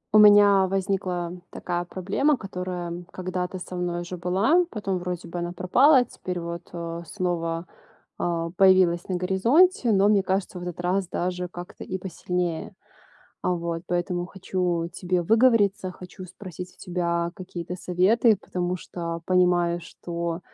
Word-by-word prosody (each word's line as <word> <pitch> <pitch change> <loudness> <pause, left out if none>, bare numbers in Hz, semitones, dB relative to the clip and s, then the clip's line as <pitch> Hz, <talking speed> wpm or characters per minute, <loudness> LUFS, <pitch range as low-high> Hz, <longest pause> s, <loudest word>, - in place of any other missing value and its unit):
У - - +9
меня 205 -2 +7
возникла 185 -2 -1 0.2
такая 175 -1 -3
проблема, 205 +12 0
которая, 180 -4 -5
м, 175 +1 -7
когда-то 185 0 -3
со 180 0 -7
мной 175 -1 -2
уже 175 +1 -6
была, 195 - +3
потом 195 - -2
вроде 180 -1 -5
бы 175 +1 -5
она 175 0 -3
пропала, 250 - +5
а 250 - +4
теперь 180 -5 -5
вот, 170 0 -6
э, 170 -1 -5
снова, 170 -3 -2 0.5
а, 170 -1 -1
появилась 185 -2 +5
на 185 - 0
горизонте, 230 - +3
но 200 0 +4
мне 205 -2 +4
кажется 190 -1 -2
в - - -8
этот 175 -1 -5
раз 180 +1 0
даже 180 +1 -2
как-то 175 +1 -9
и 185 - -4
посильнее. 180 -2 -3 0.7
А, - - +1
вот 170 -1 -3
поэтому 175 0 -1
хочу 180 -2 -2
тебе 180 0 -1
выговориться, 210 -3 +3
хочу 185 +1 -10
спросить 180 -1 -9
у - - -32
тебя 170 -2 -1
какие-то 180 -1 -6
советы, 200 +6 +3
потому 180 -1 -3
что 170 -1 -5
понимаю, 175 -1 +3
что, 170 0 -5
180 Hz, 150 wpm, -25 LUFS, 175-190 Hz, 0.7 s, У